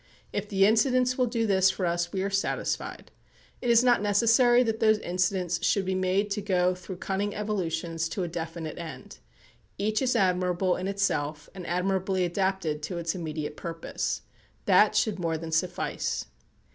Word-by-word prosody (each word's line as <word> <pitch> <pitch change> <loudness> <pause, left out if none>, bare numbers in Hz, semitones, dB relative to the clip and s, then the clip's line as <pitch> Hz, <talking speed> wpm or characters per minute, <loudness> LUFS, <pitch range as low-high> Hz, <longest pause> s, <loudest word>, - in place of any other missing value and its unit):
If 205 0 -3
the 195 -1 +4
incidents 250 +4 +3
will 255 -1 +1
do 230 -1 0
this 190 -2 +4
for 190 -1 -2
us 170 0 -1
we 190 -1 -2
are 200 - -2
satisfied. 195 0 -2 0.5
It 245 - -1
is 235 +1 +6
not 245 -4 +4
necessary 230 +4 +4
that 225 -2 -2
those 215 -1 +4
incidents 180 -2 -1
should 195 +1 +2
be 190 - -1
made 185 +2 0
to 210 - -1
go 185 -2 +2
through 180 +1 -8
cunning 200 +3 -2
evolutions 165 -6 -2
to 190 - -3
a - - -2
definite 165 -1 -5
end. 160 - -9 0.6
Each 215 +3 0
is 255 -2 +1
admirable 180 -2 +2
in 185 - -4
itself, 155 -7 -1
and 185 -3 -8
admirably 185 +1 0
adapted 175 -4 -1
to 170 +4 -4
its 165 -1 -2
immediate 155 -4 -4
purpose. 165 0 -4 0.4
That - - +5
should 210 -4 +1
more 165 -2 -1
than 165 0 -7
suffice. 175 +2 -1
190 Hz, 170 wpm, -27 LUFS, 170-205 Hz, 0.6 s, is